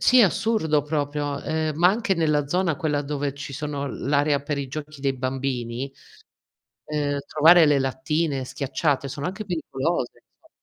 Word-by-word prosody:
sì 255 - +5
è - - +8
assurdo 180 -6 +2
proprio, 145 -1 -2
ehm, 155 -1 -1
ma 175 +3 +6
anche 200 -1 +1
nella 150 -3 +1
zona 175 0 +1
quella 150 -4 0
dove 145 -1 -3
ci 140 0 -7
sono 140 0 -3
l'area 145 +2 +1
per 145 0 -3
i 140 -1 -3
giochi 150 +1 -7
dei 135 -1 0
bambini, 130 0 -3 0.9
ehm, 145 -1 -1
trovare 165 +3 +7
le 145 -2 +4
lattine 135 +2 -1
schiacciate, 140 +2 -1
sono 140 +2 -6
anche 195 +5 -4
pericolose, 160 -5 -2 0.2
inso - - -22
145 Hz, 160 wpm, -24 LUFS, 140-160 Hz, 0.9 s, è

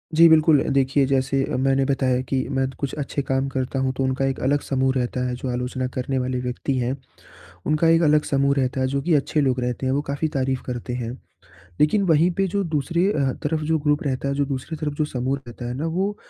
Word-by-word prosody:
जी, 165 +1 +8
बिल्कुल। 155 -3 +5
अ, - - -5
देखिए 135 0 +3
जैसे 135 0 +1
अ, - - -3
मैंने 135 +1 +2
बताया 130 -2 +1
कि 135 - +1
मैं 135 -1 0
कुछ 140 -2 -3
अच्छे 140 0 -2
काम 135 0 -1
करता 130 0 -2
हूँ 130 0 +1
तो 135 - 0
उनका 130 +1 0
एक 135 -1 -1
अलग 145 +2 +2
समूह 130 -1 0
रहता 125 0 -1
है। 125 - -2
जो 125 +1 -5
आलोचना 125 +1 -2
करने 130 +1 -1
वाले 125 0 -2
व्यक्ति 125 +2 -2
हैं 125 +2 -1 0.7
उनका 155 +2 +2
एक 165 +1 +5
अलग 150 -1 +4
समूह 140 0 +2
रहता 130 0 0
है, 130 - +2
जो 140 +1 -1
कि 170 -1 +2
अच्छे 150 +1 +1
लोग 130 -2 +1
रहते 125 +1 -2
हैं 130 - +1
वो 140 - +1
काफ़ी 150 +3 -1
तारीफ़ 130 -1 -1
करते 125 -1 -4
हैं। 120 -2 -3 0.7
लेकिन 195 +7 +3
वहीं 165 +1 +4
पे 195 0 +2
जो 200 +2 -1
दूसरे 165 +2 0
अ, 135 -6 +1
तरफ़ 155 +1 0
जो 160 +1 +1
ग्रुप 150 0 +1
रहता 140 -1 -2
है, 140 - 0
जो 140 0 +1
दूसरी 135 +3 -4
तरफ़ 150 -1 -3
जो 155 - 0
समूह 130 0 -2
रहता 120 +1 -8
है 120 - -3
ना 155 - -2
वो 200 +2 0
135 Hz, 240 wpm, -23 LUFS, 130-150 Hz, 0.7 s, जी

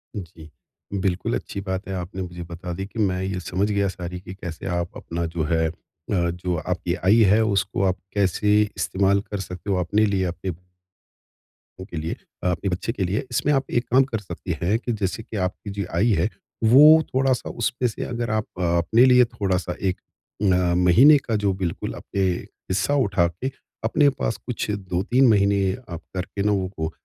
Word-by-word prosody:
हुँ 105 - -2
जी। 80 -2 -14 0.5
बिल्कुल, 90 -9 0
अच्छी 80 - -5
बात 95 -1 -4
है 95 - -4
आपने 90 +1 -5
मुझे 90 -1 -6
बता 85 +1 -7
दी 95 +3 -4
कि 110 +3 -8
मैं 95 -3 +1
ये 95 -1 -2
समझ 95 +3 -1
गया 100 -1 +1
सारी 90 -1 -5
की 95 0 -9
कैसे 85 -4 -7
आप 85 0 -4
अपना 85 0 -4
जो 80 - 0
है 80 -1 +2
अ, - - -3 0.4
जो 90 -1 0
आपकी 85 +2 -2
आय 100 +4 +6 0.2
है 110 +2 +5
उसको 100 -2 0
आप 95 0 +1 0.2
कैसे 105 +1 +3 0.2
इस्तेमाल 100 +1 +2
कर 105 0 -6
सकते 90 +1 -7
हो - - +2
अपने 105 +5 +2
लिए 100 -2 +1
अपने 90 +1 -4 1.3
को 95 - -6
के 90 -4 -8
लिए, 80 +2 -3 0.4
आपके 90 +3 -2
बच्चे 95 +5 -2
के 110 -5 -2
लिए। 100 - 0
इसमें 140 +4 +1
आप 135 -1 0
एक 120 - -8
काम 130 +2 +6
कर 110 - -1
सकते 90 -3 -5
हैं 100 +6 +2
कि 120 - -3
जैसे 95 +4 -1
कि 110 - -7
आपकी 95 +3 -9
जो 100 - 0 0.2
आय 115 +4 +3
है, 90 +6 +2 0.3
वो 150 +8 +8
थोड़ा-सा 130 -1 +1
उसमें 125 +1 +1
से 110 - -5
अगर 120 -1 -3
आप 110 0 0 0.2
अपने 85 +7 +4
लिए 125 0 +7
थोड़ा-सा 90 -3 -1
एक 90 - -3 0.5
अ, 90 -3 +3
महीने 135 - +7
का 110 - +2
जो 100 -1 +2
बिल्कुल 85 - -3
अपने 100 - -3 0.5
हिस्सा 100 +10 +1
उठा 95 -4 +2
के 95 +11 -4 0.3
अपने 140 +6 +4
पास 115 - 0
कुछ 125 -3 -3 0.2
2-3 120 +9 +3
महीने 100 0 +3 0.4
आप - - -13
करके 95 +2 -3
ना 100 - +2
वो 85 -4 -4
95 Hz, 190 wpm, -23 LUFS, 90-110 Hz, 1.3 s, वो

